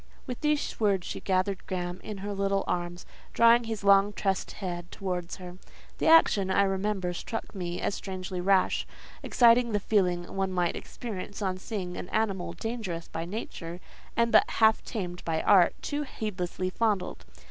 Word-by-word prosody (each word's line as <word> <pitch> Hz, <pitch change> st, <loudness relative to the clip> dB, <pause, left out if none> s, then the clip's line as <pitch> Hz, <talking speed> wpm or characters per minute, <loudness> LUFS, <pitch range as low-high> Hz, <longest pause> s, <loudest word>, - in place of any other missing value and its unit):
With 250 Hz, -3 st, -6 dB
these 300 Hz, -1 st, 0 dB
words 200 Hz, -5 st, +2 dB
she -, -, -4 dB
gathered 185 Hz, 0 st, -1 dB
Graham 180 Hz, -1 st, -3 dB
in 210 Hz, -2 st, -6 dB
her 205 Hz, -, -3 dB
little 195 Hz, 0 st, 0 dB
arms, 175 Hz, 0 st, -3 dB, 0.3 s
drawing 235 Hz, 0 st, +6 dB
his 225 Hz, -2 st, -4 dB
long 200 Hz, +1 st, +5 dB
tressed 195 Hz, -2 st, -1 dB
head 175 Hz, -3 st, -5 dB
towards 180 Hz, -3 st, -4 dB
her. 180 Hz, -1 st, -10 dB, 0.4 s
The -, -, +1 dB
action, 210 Hz, -12 st, +6 dB
I 195 Hz, +1 st, +4 dB
remember, 195 Hz, -1 st, -1 dB
struck 225 Hz, +5 st, -5 dB
me 175 Hz, -3 st, -4 dB
as -, -, -1 dB
strangely 185 Hz, -2 st, -5 dB
rash; 190 Hz, 0 st, +2 dB, 0.3 s
exciting 235 Hz, -1 st, +4 dB
the 205 Hz, -, +2 dB
feeling 180 Hz, -4 st, 0 dB
one 195 Hz, -1 st, 0 dB
might 180 Hz, -2 st, 0 dB
experience 210 Hz, -2 st, -6 dB
on 185 Hz, -1 st, -1 dB
seeing 185 Hz, -4 st, -5 dB
an 180 Hz, -, -6 dB
animal 200 Hz, -5 st, -1 dB
dangerous 220 Hz, -8 st, -4 dB
by 165 Hz, +1 st, -4 dB
nature, 175 Hz, -3 st, -6 dB, 0.4 s
and 235 Hz, 0 st, +3 dB
but -, -, +6 dB
half 220 Hz, -1 st, +4 dB
tamed 180 Hz, -6 st, -5 dB
by 160 Hz, -1 st, -1 dB
art, 185 Hz, -4 st, +5 dB
too 290 Hz, 0 st, -2 dB
heedlessly 185 Hz, -8 st, -3 dB
fondled. 205 Hz, -4 st, -1 dB
195 Hz, 165 wpm, -28 LUFS, 180-215 Hz, 0.4 s, drawing